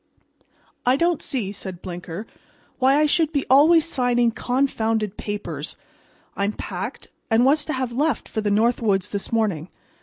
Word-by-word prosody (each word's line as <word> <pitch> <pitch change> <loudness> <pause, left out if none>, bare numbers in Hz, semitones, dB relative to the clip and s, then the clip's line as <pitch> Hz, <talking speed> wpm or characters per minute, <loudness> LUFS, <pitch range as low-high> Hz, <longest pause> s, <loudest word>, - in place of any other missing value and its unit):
"I 250 +1 +4
don't 340 +2 +1
see," 225 -8 -2
said 190 -3 -7
Blinker, 175 +2 -6 0.5
"why 265 +2 +4
I 305 - +4
should 310 +1 +2
be 285 -3 -1
always 315 +4 +6
signing 245 -5 +2
confounded 225 -5 0
papers. 205 0 -5 0.6
I 200 - -1
am 205 +1 0
packed, - - -6 0.2
and 230 +2 +4
was 290 +3 +3
to 310 - -3
have 260 -2 -2
left 285 +2 0
for 220 - -3
the 210 - 0
North 225 +5 +2
Woods 195 -4 +1
this 200 -1 -4
morning. 200 -8 0
235 Hz, 160 wpm, -23 LUFS, 205-275 Hz, 0.6 s, always